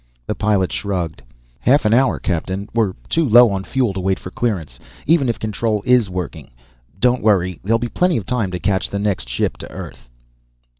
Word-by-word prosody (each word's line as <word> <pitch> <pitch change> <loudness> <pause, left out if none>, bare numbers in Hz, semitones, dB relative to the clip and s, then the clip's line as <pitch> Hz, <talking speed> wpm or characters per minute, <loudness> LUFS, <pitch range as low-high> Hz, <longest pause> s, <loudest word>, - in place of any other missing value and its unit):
The - - -2
pilot 100 -3 +1
shrugged. 85 -8 -3 0.4
"Half 140 +2 +3
an 105 - +3
hour, 130 +3 +3
captain. 95 +3 -3
We're 110 -5 +1
too 165 - +1
low 120 0 +7
on 95 -1 -2
fuel 125 -2 0
to 95 - -4
wait 95 +1 0
for 90 - -9
clearance, 90 - -3 0.3
even 150 -5 +3
if 115 - -1
control 110 -1 -2
is 125 -5 +4
working. 90 -5 -5 0.5
Don't 125 +2 +2
worry. 95 -5 +2
There'll 115 +4 +2
be 120 +1 -3
plenty 180 +5 +1
of 105 - -4
time 115 -3 -1
to 90 -1 -4
catch 95 +1 0
the 100 - -3
next 100 -11 -1
ship - - -1
to - - -9
Earth." - - -10
100 Hz, 195 wpm, -19 LUFS, 95-120 Hz, 0.5 s, low